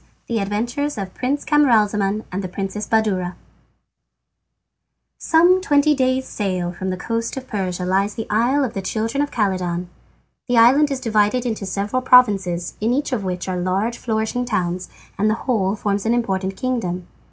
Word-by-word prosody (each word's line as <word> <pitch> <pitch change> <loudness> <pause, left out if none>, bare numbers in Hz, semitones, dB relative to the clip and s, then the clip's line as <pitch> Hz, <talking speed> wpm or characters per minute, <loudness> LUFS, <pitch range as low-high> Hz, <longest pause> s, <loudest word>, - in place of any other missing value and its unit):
The 230 -2 -1
Adventures 235 +8 -2
of 195 -2 -5
Prince 275 +3 -2
Camaralzaman 215 -8 +2
and 190 +2 -3
the - - -3
Princess 195 +3 -4
Badoura 190 -5 0 1.8
Some 350 +3 +4
twenty 300 -4 +3
days' 260 -1 +1
sail 185 -4 -2
from 190 +2 -4
the 185 - -2
coast 230 +6 -3
of 260 -1 -6
Persia 185 -3 -3
lies 195 +2 +1
the 225 - -4
isle 245 +7 +2
of 250 - -2
the 195 - -3
children 225 +7 -1
of 290 - -1
Khaledan. 185 -6 -1 0.6
The 245 - +2
island 265 +6 +6
is 275 -2 -2
divided 220 +1 +1
into 220 -5 -3
several 205 +6 -1
provinces, 195 -9 +4
in 225 +2 +1
each 285 +2 -1
of 220 -5 -1
which 180 -1 -3
are 185 -1 -2
large 190 +6 -1
flourishing 220 +2 -1
towns, 185 -6 -2 0.3
and 210 +2 +3
the 215 - +2
whole 210 -6 +1
forms 205 0 -2
an 235 - +3
important 190 -5 -1
kingdom. 220 -9 -2
215 Hz, 165 wpm, -21 LUFS, 190-250 Hz, 1.8 s, island